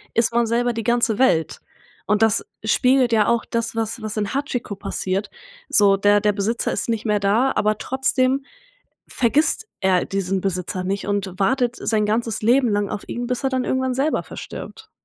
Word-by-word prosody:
ist 230 0 +2
man 235 -1 +2
selber 240 +1 +1
die 225 - -3
ganze 235 -2 +1
Welt 165 - +2 0.5
und 210 +2 +2
das 220 -2 +3 0.2
spiegelt 250 +2 +3
ja 215 -2 +3
auch 235 -1 +1
das, 230 -1 -3
was 225 +1 -3
was 215 0 -5
in 205 -1 -2
Hachiko 265 -6 -3
passiert 195 +1 -3 0.4
so 200 -2 +5
der 205 +1 +4
der 210 0 +2
Besitzer 215 +4 -1
ist - - -3
nicht 225 -1 -1
mehr 210 -1 +1
da, 215 +7 +2
aber 215 0 +1
trotzdem 265 +2 0 0.6
vergisst 290 - +1
er 185 -2 +2
diesen 195 -1 -2
Besitzer 185 -1 -2
nicht 195 +2 -2
und 195 -2 -2
wartet 245 +4 +1
sein 215 -2 0
ganzes 225 0 -1
Leben 245 +2 +4
lang 205 -1 0
auf 205 - -6
ihn, 240 0 -4
bis 250 +1 -3
er 270 - +2
dann 260 -1 0
irgendwann 260 -1 0
selber 280 +4 0
verstirbt. - - -9
225 Hz, 185 wpm, -21 LUFS, 205-245 Hz, 0.6 s, so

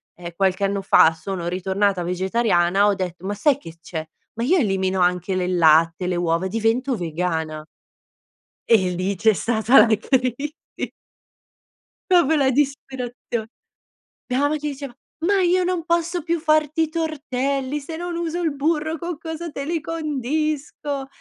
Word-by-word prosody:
ehm, 175 0 -8
qualche 190 +1 +1
anno 195 0 -1
fa 165 -4 +5
sono 170 +2 -5
ritornata 190 +1 0
vegetariana 185 +1 +2
ho 205 - +3
detto: 180 -2 -5
"Ma 200 - -1
sai 270 +7 +2
che 165 -12 -12
c'è? 160 -1 -5 0.3
Ma, 230 - -3
io 350 +9 +3
elimino 190 - 0
anche 180 +1 +1
le 180 -1 0
latte, 165 0 +4
le 180 -1 -1
uova, 170 +1 0
divento 230 +4 0
vegana" 160 -3 -3 1.0
e 195 -6 +4
lì 185 +3 -1
c'è 220 +4 +3
stata 225 +4 +4
la 225 -1 +3
crisi 255 +5 -1 1.6
proprio 320 -3 +5
la 275 -3 +3
disperazion 255 -4 -2 0.8
Mia 250 0 0
mamma 290 +2 +1
che 300 0 -3
diceva: 280 -1 -7 0.4
"Ma 400 0 +3
io 360 +1 +3
non 355 -2 -1
posso 340 0 0
più 335 +1 0
farti 310 0 +2
i 315 - -2
tortelli, 280 -3 -2
se 305 +3 -7
non 350 +1 -4
uso 340 0 -2
il 315 -4 -1
burro, 315 +2 0
con 340 -2 -5
cosa 325 0 -6
te 275 -1 -5
li 330 +2 -1
condisco?" 295 -2 -3
250 Hz, 155 wpm, -22 LUFS, 185-305 Hz, 1.6 s, fa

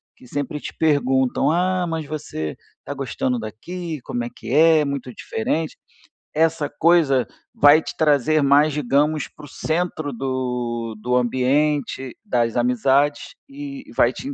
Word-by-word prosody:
que - - -18
sempre 145 +2 -3
te - - -7
perguntam: 135 -4 +2
"Ah, 180 +1 +1
mas 160 -2 -3
você 140 - -5 0.3
tá 145 - -4
gostando 130 -2 -2
daqui? 160 - -6
Como 120 -1 -3
é 120 - -4
que - - -8
é, 160 +1 +6
muito 140 -3 -4
diferente?". 155 +9 -2 0.6
Essa 160 -2 +1
coisa 145 -5 +3 0.3
vai 145 +2 +6
te - - -7
trazer 155 0 +3
mais, 145 +2 +5
digamos, 150 +2 +1
para 150 - -14
o - - -12
centro 155 -1 -2
do 125 -3 -3
do 125 +3 -1
ambiente, 130 +2 0
das 120 - 0
amizades, 130 +4 +1
e 280 -1 -8
e - - -13
vai - - +4
te - - -8
in 285 - -4
145 Hz, 150 wpm, -22 LUFS, 125-155 Hz, 0.6 s, é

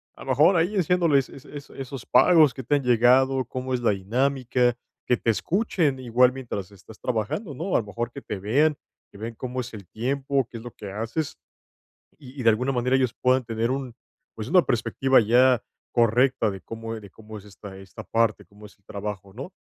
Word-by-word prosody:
a - - -11
lo - - -9
mejor, 155 +8 +5
ahí 175 +5 +1
enseñándoles 170 -7 +2
es 135 - -13
es 145 -2 -10
esos 135 -2 -8
pagos 160 -6 +5
que 130 - -7
te 145 +5 +1
han 140 - 0
llegado, 130 +2 +4
cómo 130 +2 -5
es 125 - 0
la 115 - +3
dinámica, 125 +4 0 0.3
que 125 - +2
te - - -2
escuchen 165 - 0
igual 125 0 +3
mientras 115 -7 -6
estás 100 +2 -15
trabajando, 125 - -3
¿no? 170 +8 -3
A - - +5
lo 115 - -5
mejor 120 +3 -4
que 140 - -9
te 100 - -6
vean, 140 +10 +2 0.3
que - - -14
vean 115 +3 -6
cómo 130 +2 -5
es 125 0 -9
el 100 -5 -10
tiempo, 135 +2 -1
qué 115 - -8
es 115 - -10
lo 120 - -8
que 100 - -9
haces, 115 +9 -4 0.8
y 135 -1 -11
y - - -2
de 115 - +4
alguna 125 +5 0
manera 125 +1 +1
ellos 130 -3 +1
puedan 130 0 +2
tener 115 +1 -2
un 130 -2 -3 0.4
pues 110 +1 -6
una 180 +1 +5
perspectiva 130 +3 +2
ya 120 +2 +4 0.3
correcta 120 0 +2
de 95 -1 -7
cómo 115 0 -6
eh, - - -8
de 100 -2 -13
cómo 110 +2 -12
es 100 - -14
esta 100 -1 -11
esta 95 +3 -11
parte, 115 +3 0
cómo 105 +1 -17
es 105 - -19
el 100 - -39
trabajo, 100 -1 -6
¿no? 135 +10 -8
125 Hz, 215 wpm, -25 LUFS, 110-135 Hz, 0.8 s, mejor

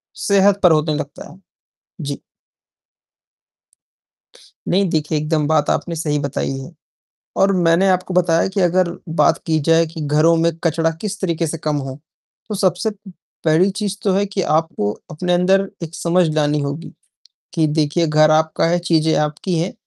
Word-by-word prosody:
सेहत 200 0 +2
पर 180 - +7
होने 155 -1 +2
लगता 145 -1 -7
है। 185 - -17 0.6
जी। 140 -2 -5 2.5
नहीं, 190 0 +2
देखिए 155 -1 -1
एकदम 155 0 0
बात 155 -1 +2
आपने 170 -1 -1
सही 150 -2 -1
बताई 140 -1 -3
है 135 +6 -9 0.7
और 195 0 +4
मैंने 175 +2 +3
आपको 185 0 0
बताया 170 -2 +2
कि 195 +1 -2
अगर 180 0 +2 0.2
बात 150 -3 +2
की 160 -1 +1
जाए 165 0 +4
कि 160 0 -9
घरों 155 +3 +3
में 165 0 +2
कचड़ा 165 0 +1
किस 210 -1 -5
तरीके 170 -3 -1
से 160 +1 -4
कम 155 -1 -2
हो 130 +2 -8 0.5
तो 215 - -3
सबसे 190 +2 0 0.5
पहली 165 +5 +3
चीज 205 0 -4
तो 195 - +1
है 200 +2 +2
कि 195 -1 -3
आपको 155 -10 0 0.2
अपने 180 +3 -2
अंदर 190 +2 +2
एक 165 0 -6
समझ 175 +1 +1
लानी 150 -1 +1
होगी 145 +4 -5 0.6
कि 160 -2 +2
देखिए 155 +2 0
घर 155 0 +4
आपका 160 +1 +2
है, 175 +1 +1
चीज़ें 160 -2 +1
आपकी 150 +4 -1
हैं 175 +3 -2
165 Hz, 165 wpm, -19 LUFS, 155-185 Hz, 2.5 s, पर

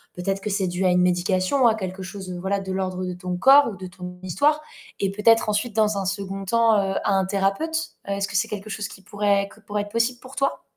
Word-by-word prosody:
peut-être, 195 +2 -2
que 210 - -3
c'est 195 -2 0
dû 180 +2 -1
à - - +5
une 180 0 +3
médication, 185 +7 +2
à 225 - +4
quelque 190 -2 -5
chose, 190 0 -7
voilà, 195 +2 -1
de 190 -1 -5
l'ordre 185 -1 -2
de 180 - -3
ton 180 0 -4
corps 275 +8 +7
ou 210 - -7
de 185 0 -7
ton 180 0 -9
histoire 285 - +2 0.4
et 195 -1 +1
peut-être 220 +2 +4
ensuite 210 +2 -1
dans 215 -2 +2
un 195 - -2
2nd 195 0 -3
temps, 230 +1 +4
heu, 195 -1 0
à 200 - +1
un 190 -1 +2
thérapeute. 210 - -1
Heu, 200 - -1
est-ce 200 0 -1
que 195 - -1
c'est 215 +5 +1
quelque 210 -1 -6
chose 210 -1 -3
qui 195 - -12
pourrait 200 0 0
que 220 - -18
pourrait 210 -1 -3
être 205 - -11
possible 230 +2 0
pour 260 +1 -12
toi? 275 - 0
200 Hz, 250 wpm, -24 LUFS, 185-220 Hz, 0.4 s, corps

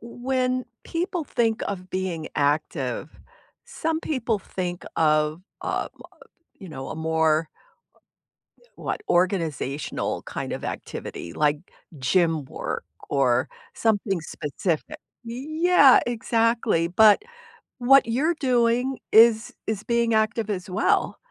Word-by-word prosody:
when 255 +2 -1 0.2
people 345 -1 -2
think 225 -5 0
of 185 -2 -6
being 185 -4 -3
active, 145 +1 -1 0.5
some 320 0 -2
people 245 -9 -1
think 180 -2 -5
of, 155 +1 +2 0.2
uh, - - -2 0.7
you 190 -4 -10
know, 135 -3 -7
a - - -6
more 160 0 +1 1.3
what, - - -4
organizational 165 -6 -1
kind - - -5
of - - -5
activity, 85 - -6
like, 150 - +1 0.4
gym 160 +2 +2
work - - -5 0.2
or 130 -2 +2 0.3
something 205 -4 0
specific. 160 +1 -3 0.3
Yeah, 290 +4 +4
exactly, 230 -6 +1
but, 210 - +6 0.6
what 270 +1 +6
you're 285 +9 +1
doing 245 0 +2
is 225 0 +6
is 215 -1 -2
being 235 -1 +1
active 220 0 +1
as 185 -2 -3
well, 180 - +1
210 Hz, 105 wpm, -24 LUFS, 160-240 Hz, 1.3 s, but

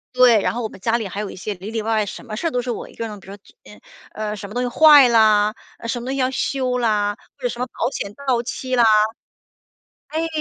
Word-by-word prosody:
对， 245 -4 +6
然 - - 0
后 245 - -3
我 - - -1
们 - - -13
家 230 0 +1
里 225 -4 -4
还 200 +2 -5
有 210 - -5
一 - - -10
些 210 +3 -4
里 195 +4 -9
里 225 -1 -2
外 225 +1 -1
外 215 -1 +1
什 200 - -8
么 215 -3 -6
事 330 - -2
儿 - - -2
都 250 - 0
是 245 - -6
我 240 - -5
1 - - -17
个 230 - -4
人。 210 -1 -8
比 - - -17
如 200 - -8
说， - - -19 0.7
呃， 215 -1 -4
什 200 -1 -8
么 210 - -10
东 245 - -1
西 - - -1
坏 295 0 +7
了， 215 -2 +4 0.3
呃， 230 - -7
什 240 +1 -2
么 - - -8
东 265 - -3
西 275 - -3
要 255 0 +2
修 255 -1 -1
啦， 210 -4 +1 0.2
或 - - -20
者 - - +2
什 240 - -7
么 250 - 0
保 245 - -2
险 200 -5 -5
到 245 -2 +2
期 255 +1 -3
啦。 240 - +4 1.3
哎， 320 +2 -2
230 Hz, 300 characters per minute, -21 LUFS, 210-250 Hz, 1.3 s, 坏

